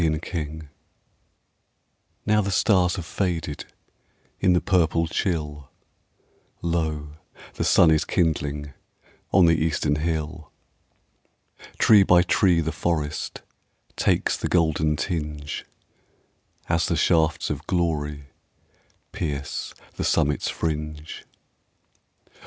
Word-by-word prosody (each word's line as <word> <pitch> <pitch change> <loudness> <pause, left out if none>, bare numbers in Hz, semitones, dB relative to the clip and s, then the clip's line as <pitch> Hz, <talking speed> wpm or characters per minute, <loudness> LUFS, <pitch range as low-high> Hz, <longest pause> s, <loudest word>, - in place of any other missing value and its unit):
At 80 0 0
Sunrise 80 -2 -4 1.6
Now 105 0 +3
the 100 - -2
stars 90 -2 +3
have 85 - -5
faded 80 -6 -3 0.7
In 95 -2 +4
the 90 - +4
purple 85 -4 +2
chill, 75 -5 -3 0.9
Lo, 80 -3 -2 0.4
the - - -3
sun 80 - +5
is 80 0 +3
kindling 75 -5 -1 0.6
On 95 -3 +6
the 80 -1 +3
eastern 75 -2 0
hill. 80 0 -3 1.3
Tree 105 -3 +6
by 90 -2 +5
tree 90 -1 +3
the 80 0 -2
forest 75 -4 -2 0.5
Takes - - +1
the - - -3
golden 80 -3 +2
tinge, 75 -4 -4 1.0
As 85 +1 +1
the 85 - 0
shafts 80 -1 +2
of 75 +2 -5
glory 75 -5 -1 0.9
Pierce 70 -3 -4 0.2
the - - -2
summit's 75 -2 +1
fringe. 75 -1 -4
80 Hz, 100 wpm, -24 LUFS, 75-85 Hz, 1.6 s, On